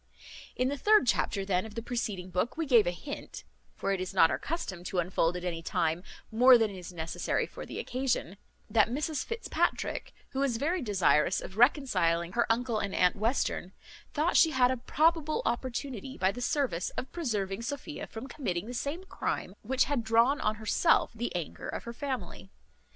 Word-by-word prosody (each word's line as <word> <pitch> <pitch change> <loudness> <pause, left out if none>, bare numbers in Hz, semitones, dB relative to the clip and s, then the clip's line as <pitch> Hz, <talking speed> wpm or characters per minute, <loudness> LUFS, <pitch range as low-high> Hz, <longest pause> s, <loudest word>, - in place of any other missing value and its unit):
In 255 +1 +1
the 285 0 -3
third 425 -6 +5
chapter, 200 -4 +1
then, 185 -2 +1
of 220 -1 -10
the 230 - -3
preceding 205 -7 -3
book, 185 - -1
we 325 - 0
gave 240 -8 +5
a - - +2
hint 280 +11 -8 0.3
(for 195 - -2
it 195 -2 0
is 185 +1 -5
not 165 -3 +6
our - - -1
custom 200 - -4
to 185 - -3
unfold 175 0 +1
at 180 - -7
any 170 -2 -3
time 165 0 0 0.3
more 250 +3 +7
than 225 -2 +1
is 185 -2 -8
necessary 165 -2 -2
for - - -9
the - - -7
occasion) 250 -7 -2 0.3
that 220 -1 +3
Mrs 290 +3 -1
Fitzpatrick, 460 0 -2 0.2
who 265 - -3
was 270 -4 +1
very 330 +8 0
desirous 185 - +3
of 190 - -8
reconciling 200 - +3
her 235 +3 +1
uncle 235 -1 0
and 200 -2 -3
aunt 180 0 +4
Western, 215 -4 -1 0.4
thought 315 +4 +1
she 325 - +7
had 255 -4 +3
a 260 - -1
probable 310 +4 +1
opportunity, 260 +1 -3
by 190 +1 +2
the 245 - -7
service 250 - 0
of 260 - -4
preserving 210 - -2
Sophia 285 +4 -5
from 225 +3 -7
committing 205 - -3
the 245 - -6
same 285 +8 -3
crime 285 - -3
which 260 +4 +2
had 275 -4 -1
drawn 230 +6 +3
on 215 0 +1
herself 220 +10 +2
the 235 +1 -3
anger 175 -3 -4
of - - -4
her 235 - -6
family. 265 0 -5
235 Hz, 190 wpm, -30 LUFS, 190-270 Hz, 0.4 s, more